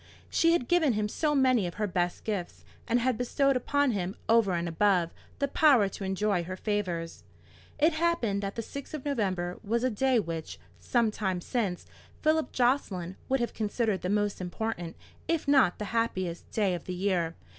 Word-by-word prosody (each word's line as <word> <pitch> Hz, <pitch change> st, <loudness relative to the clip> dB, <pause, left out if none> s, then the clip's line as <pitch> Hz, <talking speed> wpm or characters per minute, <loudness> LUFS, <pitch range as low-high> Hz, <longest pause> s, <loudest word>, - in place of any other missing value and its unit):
She 330 Hz, 0 st, +4 dB
had 255 Hz, -8 st, 0 dB
given 325 Hz, -7 st, +3 dB
him 210 Hz, 0 st, 0 dB
so 295 Hz, +7 st, 0 dB
many 255 Hz, -8 st, +3 dB
of 175 Hz, -, -7 dB
her 210 Hz, -, -1 dB
best 175 Hz, -2 st, -1 dB
gifts, 200 Hz, -5 st, -4 dB, 0.2 s
and 240 Hz, +1 st, +2 dB
had 245 Hz, -1 st, 0 dB
bestowed 275 Hz, +2 st, +2 dB
upon 285 Hz, +2 st, +1 dB
him, 190 Hz, -3 st, -2 dB
over 225 Hz, -4 st, +4 dB
and 170 Hz, 0 st, -1 dB
above, 175 Hz, 0 st, +2 dB, 0.2 s
the 280 Hz, -, 0 dB
power 275 Hz, -7 st, +5 dB
to 195 Hz, -, -7 dB
enjoy 190 Hz, -1 st, 0 dB
her 185 Hz, +2 st, -5 dB
favours. 185 Hz, -6 st, -3 dB, 0.5 s
It 310 Hz, +3 st, +4 dB
happened 315 Hz, -12 st, +1 dB
that 200 Hz, 0 st, -4 dB
the 230 Hz, -, -3 dB
6th 280 Hz, +6 st, -7 dB
of 295 Hz, -, -7 dB
November 185 Hz, -10 st, -1 dB
was 230 Hz, +3 st, 0 dB
a 255 Hz, -, +2 dB
day 255 Hz, +3 st, +2 dB
which, 165 Hz, -5 st, -5 dB, 0.2 s
some 235 Hz, -3 st, +1 dB
time 190 Hz, -4 st, -2 dB
since, 195 Hz, -2 st, -2 dB, 0.4 s
Philip 315 Hz, 0 st, +2 dB
Jocelyn 210 Hz, -9 st, 0 dB
would 265 Hz, -1 st, +2 dB
have 235 Hz, -, -2 dB
considered 215 Hz, -2 st, -1 dB
the 180 Hz, -, -2 dB
most 205 Hz, -1 st, 0 dB
important, 180 Hz, -2 st, -4 dB, 0.3 s
if 330 Hz, -3 st, 0 dB
not 270 Hz, -11 st, +4 dB
the 210 Hz, -, -4 dB
happiest, 185 Hz, -7 st, -1 dB
day 205 Hz, -4 st, +1 dB
of 175 Hz, -, -5 dB
the 185 Hz, -, -4 dB
year. 180 Hz, -3 st, 0 dB
210 Hz, 185 wpm, -29 LUFS, 185-260 Hz, 0.5 s, power